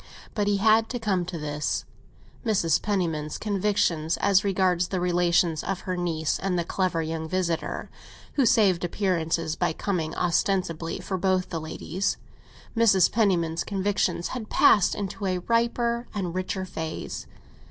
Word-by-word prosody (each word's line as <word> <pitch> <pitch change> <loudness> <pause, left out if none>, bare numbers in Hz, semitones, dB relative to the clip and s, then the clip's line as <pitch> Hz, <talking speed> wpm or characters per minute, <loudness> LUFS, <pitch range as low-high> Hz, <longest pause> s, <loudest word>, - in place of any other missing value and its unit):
But 205 -2 0
he 205 -1 +2
had 220 +2 +4
to 245 - -3
come 195 -5 0
to 175 -1 -5
this. 150 -1 -2 0.6
Mrs. 190 - +2
Penniman's 165 -7 -1
convictions 195 -6 0
as 200 -1 +3
regards 185 -3 +2
the 185 0 -2
relations 175 -2 +2
of 195 -1 -3
her 185 -2 -3
niece 165 -3 -1
and 185 -1 -1
the 170 - +1
clever 175 -1 -1
young 160 0 -4
visitor 175 -2 -2 0.5
who 280 - +2
saved 200 -7 +4
appearances 165 -4 0
by 160 - 0
coming 165 -4 -2
ostensibly 170 -1 0
for 185 +2 -3
both 185 0 +1
the 165 -2 -3
ladies—Mrs. 190 +4 0
Penniman's 170 -7 +1
convictions 200 -3 -1
had 235 -4 -6
passed 200 -4 +5
into 200 0 -4
a 185 -1 0
riper 235 +4 0
and 180 -4 -2
richer 185 +1 -2
phase. 160 -3 -5
185 Hz, 140 wpm, -26 LUFS, 165-200 Hz, 0.6 s, passed